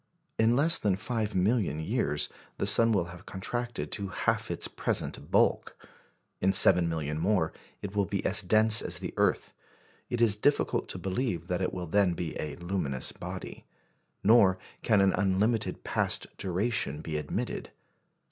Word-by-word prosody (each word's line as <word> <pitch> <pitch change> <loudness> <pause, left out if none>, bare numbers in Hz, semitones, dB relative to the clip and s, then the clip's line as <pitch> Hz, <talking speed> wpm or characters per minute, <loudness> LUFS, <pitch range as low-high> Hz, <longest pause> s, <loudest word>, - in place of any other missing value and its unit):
In 115 +2 +3
less 160 +5 +6
than 100 -3 +1
five 110 0 -3
million 95 - +1
years, 80 - -1 0.3
the - - -1
sun 115 0 +4
will 90 -5 0
have 90 +1 -14
contracted 120 +5 -4
to 100 -2 -2
half 95 - -1
its - - -1
present - - -3
bulk. - - +1 0.6
In 95 - +2
seven 90 -2 +7
million 75 -2 -3
more, 90 -3 0 0.3
it 100 0 -6
will 100 -1 +1
be 100 - -3
as 105 - +3
dense 110 +3 +5
as - - -2
the - - -6
earth. - - 0 0.6
It 120 - -3
is 115 -3 +3
difficult 145 +7 0
to - - -4
believe 95 -3 -3
that 90 0 -1
it 95 - -1
will 90 -1 -5
then 90 +2 +2
be 85 -3 -5
a 75 -1 -5
luminous 85 -7 -2
body. - - -9 0.6
Nor 100 -4 +5 0.2
can 105 -4 +3
an 95 -1 +3
unlimited 100 +4 0
past - - -2
duration 95 - -1
be 80 -1 -5
admitted. 75 - -4
95 Hz, 160 wpm, -28 LUFS, 85-110 Hz, 0.6 s, seven